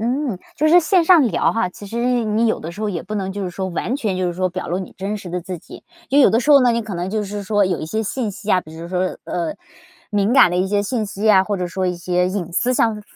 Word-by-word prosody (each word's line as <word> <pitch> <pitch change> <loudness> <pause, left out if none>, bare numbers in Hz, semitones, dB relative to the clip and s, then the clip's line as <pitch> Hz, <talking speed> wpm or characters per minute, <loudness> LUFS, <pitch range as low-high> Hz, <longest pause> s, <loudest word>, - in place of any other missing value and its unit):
嗯， 245 -2 -1 0.2
就 310 +2 +2
是 345 +3 +7
线 350 +1 +3
上 350 -1 +7
聊 225 - +1
哈， 225 -4 0
其 180 - -12
实 240 +3 0
你 215 +2 +1
有 220 - 0
的 165 - -6
时 185 +5 -10
候 215 - -1
也 180 -5 -3
不 215 - -6
能 190 -1 -3
就 200 +1 -4
是 185 - -3
说 190 +2 -4
完 205 +8 -2
全 215 -9 -2
就 185 - -1
是 - - -2
说 185 +1 -1
表 185 +1 -6
露 175 - -1
你 190 - -8
真 195 +2 -3
实 195 -3 -9
的 180 +1 -3
自 180 +1 -6
己， - - -13 0.3
因 280 - +4
为 - - +8
有 - - +6
的 225 - +3
时 250 - -3
候 280 -2 +8
呢 245 - +4
你 235 0 +1
可 215 -4 -6
能 175 +2 -3
就 215 0 -1
是 205 +1 -5
说 205 0 +2
有 185 -3 -1
一 - - -4
些 220 +7 -2
信 225 +1 -2
息 205 +1 -6
啊， 185 - +4
比 160 -2 -13
如 165 +1 -7
说， 185 0 -2
呃， 170 -2 -2 0.6
敏 205 +1 +1
感 260 -6 +7
的 175 - -2
一 185 +1 +1
些 205 +1 +1
信 220 +2 -2
息 205 0 -6
呀， 205 -3 +6
或 205 +1 -2
者 180 -1 -2
说 185 +2 -3
一 180 -1 -1
些 180 +1 0
隐 185 -3 -4
私 245 +8 +1
上 225 -4 +1
205 Hz, 330 characters per minute, -20 LUFS, 185-230 Hz, 0.6 s, 为